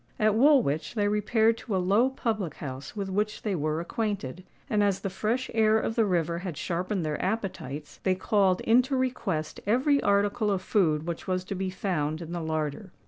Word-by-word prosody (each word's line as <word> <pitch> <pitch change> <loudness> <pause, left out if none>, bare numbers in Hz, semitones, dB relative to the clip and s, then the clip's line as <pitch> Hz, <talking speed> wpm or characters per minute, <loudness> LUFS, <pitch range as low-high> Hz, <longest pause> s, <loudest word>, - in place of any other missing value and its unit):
At 215 0 +3
Woolwich 230 - +3
they 205 -2 +2
repaired 220 +2 +2
to 215 - -3
a - - +3
low 200 +8 +3
public 220 - -2
house 135 +3 -7
with 200 -2 -3
which 210 +2 -2
they 210 - -1
were 155 -2 -1
acquainted; 185 - -3 0.2
and, 210 -1 +1
as 200 -2 +1
the 195 - -3
fresh 230 +7 -1
air 220 -1 +4
of 220 - -2
the 225 -1 +2
river 170 -3 0
had 180 -4 -5
sharpened 180 +2 -2
their 150 -1 -2
appetites, 180 - -4
they 190 -1 +2
called 190 -1 +2
into 250 +4 +3
request 245 -12 -2
every 270 +6 +3
article 205 +2 +2
of 190 -2 0
food 160 -7 +2
which 170 -1 -5
was 185 -1 0
to 185 - -5
be 190 0 -2
found 160 -5 -2
in 170 -1 -7
the 175 -1 -3
larder. 160 +4 -3
195 Hz, 195 wpm, -27 LUFS, 170-220 Hz, 0.2 s, air